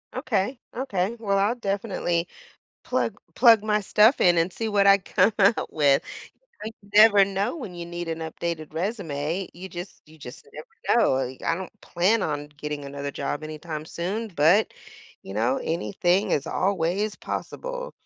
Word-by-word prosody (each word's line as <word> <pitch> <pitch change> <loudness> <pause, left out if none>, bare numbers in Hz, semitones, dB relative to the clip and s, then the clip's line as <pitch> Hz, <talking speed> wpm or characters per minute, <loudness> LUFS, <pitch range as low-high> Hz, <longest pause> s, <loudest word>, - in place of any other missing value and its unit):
Okay, 250 -2 -1 0.2
okay, 230 -4 -2
well, 200 -3 0
I'll 205 +4 +2
definitely 195 -6 -2 0.6
plug - - -1 0.2
plug 230 -4 +7
my 210 -1 +1
stuff 210 +5 +4
in 175 -1 +5
and 165 +2 +2
see 225 +5 -4
what 200 -1 +3
I 195 0 +8
come 205 - +2
out 200 +3 +3
with, 140 -3 +3 0.6
you 220 - -4 0.2
never 205 -1 +8
know 195 - -2
when 225 - -7
you 170 -1 -7
need 175 0 -6
an 165 0 -3
updated 160 -1 -5
resume. 170 -2 -3
You 185 +2 -9
just 175 +1 -9
you 155 +1 -17
just 125 -3 -11
never 155 +9 -1
know, - - +3
like, 130 0 -3
I 165 - +2
don't 190 0 -7
plan 195 +5 +1
on 145 -1 -3
getting 150 -1 -5
another 140 0 -5
job 140 +1 -4
anytime 155 0 -6
soon, 195 +8 -4
but, 175 +4 +3 0.5
you 95 - -9
know, 115 +5 +1
anything 180 +3 0
is 145 - 0
always 195 +2 0
possible. - - -5
180 Hz, 165 wpm, -25 LUFS, 155-210 Hz, 0.6 s, I